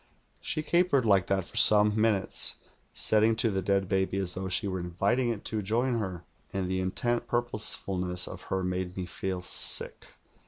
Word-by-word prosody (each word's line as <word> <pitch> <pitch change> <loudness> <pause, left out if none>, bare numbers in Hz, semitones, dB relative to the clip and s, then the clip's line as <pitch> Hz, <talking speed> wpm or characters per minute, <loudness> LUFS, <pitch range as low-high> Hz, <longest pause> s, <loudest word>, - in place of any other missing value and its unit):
"She 155 - -4
capered 170 -5 +1
like 100 -4 +2
that 95 -1 -1
for - - -10
some 105 0 +6
minutes, 110 -3 +1 0.4
setting 110 +1 +1
to 115 0 +1
the 95 -1 -2
dead 95 0 0
baby 95 0 -1
as 95 -2 -1
though 95 0 -5
she 100 +3 0
were 95 -1 -3
in\iting 100 +8 -1
it 110 - -7
to 110 -1 -2
join 115 +4 -1
her, 95 -5 -5 0.3
and 95 -1 -3
the 95 0 -2
intent 120 +6 -2
purposefulness 100 -7 +1
of - - -9
her 95 0 -2
made 90 0 -4
me 90 - -4
feel 90 +1 -5
sick. 85 - +2
100 Hz, 180 wpm, -28 LUFS, 95-115 Hz, 0.4 s, some